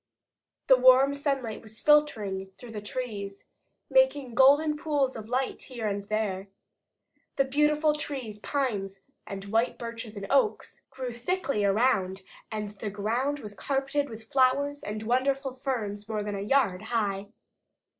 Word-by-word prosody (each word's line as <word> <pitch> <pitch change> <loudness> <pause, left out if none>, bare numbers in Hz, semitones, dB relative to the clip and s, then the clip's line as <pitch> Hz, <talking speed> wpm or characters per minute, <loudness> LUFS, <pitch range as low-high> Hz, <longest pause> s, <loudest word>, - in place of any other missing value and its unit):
The 260 - +7
warm 260 +2 +6
sunlight 275 -6 -2
was 220 0 -8
filtering 215 -11 +2
through 245 -2 -11
the 210 -2 -5
trees, 205 -3 -5 0.4
making 395 - +3
golden 285 +5 +5
pools 295 -4 0
of 220 0 -8
light 255 +2 -1
here 240 -4 -5
and 200 -1 -2
there. 205 -2 -2 0.9
The 275 - +3
beautiful 300 +2 +3
trees, 265 -8 -5
pines 205 -8 -2 0.3
and 195 -1 -6
white 225 +4 +1
birches 230 -2 -7
and 200 - -5
oaks, 280 +10 +1
grew 260 -2 -5
thickly 275 - -1
around 195 -3 +2 0.3
and 210 -1 -3
the 205 +1 -5
ground 235 +8 -1
was 210 -2 -7
carpeted 275 +5 -1
with 220 +1 -11
flowers 280 +2 +2
and 215 +1 -5
wonderful 265 +3 +1
ferns 220 -6 -4
more 215 -1 -1
than 205 0 -3
a 195 - -3
yard 205 -5 +2
high. 205 -3 -1
240 Hz, 145 wpm, -28 LUFS, 210-275 Hz, 0.9 s, The